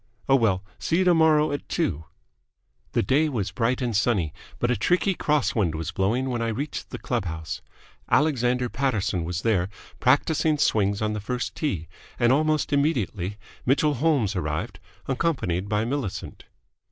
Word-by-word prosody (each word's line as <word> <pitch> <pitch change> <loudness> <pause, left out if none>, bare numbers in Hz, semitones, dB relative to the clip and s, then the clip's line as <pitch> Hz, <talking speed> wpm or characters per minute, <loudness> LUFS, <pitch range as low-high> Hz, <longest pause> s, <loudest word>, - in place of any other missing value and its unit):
Oh, 135 - +5
well! 105 -7 +2 0.2
See 165 - 0
you 185 - +3
tomorrow 160 -4 +4
at 145 - -5
two." 80 - -1 0.9
The - - +2
day 145 +9 +2
was 110 -8 -2
bright 125 +2 0
and 120 -3 -1
sunny, 100 -8 +1 0.2
but 120 - +1
a - - +2
tricky 180 +6 +2
cross 150 -5 +1
wind 90 -8 +1
was 80 +1 -3
blowing 110 +9 0
when 120 -1 -1
I 115 - 0
reached 135 +7 -4
the - - -6
club - - -2
house. 80 -2 -5 0.5
Alexander 125 -4 +2
Paterson 110 -9 -1
was 90 +1 -3
there, 100 -5 +2 0.3
practising 150 +4 +3
swings 100 -6 +2
on 105 0 0
the 105 - -3
first 125 +4 -3
tee; 95 - -2 0.3
and 120 +1 +4
almost 155 +1 +1
immediately 110 - 0 0.3
Mitchell 145 +3 +3
Holmes 130 -7 +1
arrived, 85 +3 -3 0.3
accompanied 125 - -1
by 105 +1 +1
Millicent. 120 -7 -4
120 Hz, 160 wpm, -25 LUFS, 95-145 Hz, 0.9 s, Oh